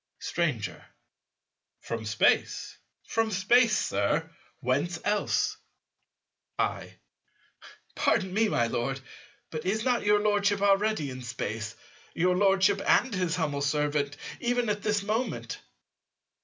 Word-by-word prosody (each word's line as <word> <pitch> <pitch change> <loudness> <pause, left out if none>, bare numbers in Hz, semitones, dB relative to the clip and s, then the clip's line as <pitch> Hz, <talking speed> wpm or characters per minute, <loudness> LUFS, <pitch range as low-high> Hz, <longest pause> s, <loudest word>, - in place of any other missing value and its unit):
Stranger. - - -2 1.0
From 115 -1 -5
Space, 110 0 +1 0.2
from 225 0 0
Space, 220 +4 +4
Sir: 100 +12 0 0.3
whence 145 +7 0
else? 210 0 +1 1.0
I. - - -2 1.0
Pardon 190 -1 +1
me, 220 +2 +3
my 120 - +2
Lord, 120 +4 -2 0.5
but 155 -1 -4
is 215 +4 -1
not 250 -2 +2
your 210 0 +4
Lordship 205 -1 +2
already 200 -7 +2
in 130 0 -7
Space, 115 -2 -4 0.4
your 180 +2 +2
Lordship 195 +1 +3
and 250 - +3
his 180 -3 0
humble 150 -5 -1
servant, 145 0 0 0.2
even 245 -1 0
at 210 0 -1
this 210 -1 0
moment? 220 +5 -2
190 Hz, 115 wpm, -28 LUFS, 145-210 Hz, 1.0 s, Space